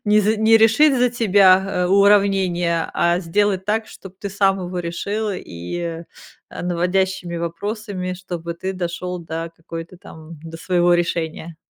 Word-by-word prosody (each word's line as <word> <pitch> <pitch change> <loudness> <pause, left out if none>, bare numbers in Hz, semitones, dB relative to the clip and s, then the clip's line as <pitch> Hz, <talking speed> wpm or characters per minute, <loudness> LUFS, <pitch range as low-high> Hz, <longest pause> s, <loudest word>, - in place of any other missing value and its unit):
не 210 0 +4
за 215 +2 +1
не 220 +1 +5
решить 245 +6 +5
за 250 0 +3
тебя, 195 -5 +3
а, - - 0
уравнение, 190 -4 +3
а 170 0 +2
сделать 190 +2 0
так, 215 +2 -1
чтоб 195 -1 -13
ты 200 - -5
сам 195 0 +1
его 180 0 -5
решил, 200 +5 -3
и, 165 - -6 0.5
а, - - -7
наводящими 180 0 -1
вопросами, 185 +3 -4
чтобы 175 -2 -6
ты 185 +3 -4
дошел 180 0 -4
до 165 0 -5
какой-то 165 +1 -9
там, 160 -2 -12
до 165 0 -9
своего 175 0 +2
решения. 170 -1 -2
180 Hz, 150 wpm, -20 LUFS, 170-200 Hz, 0.5 s, не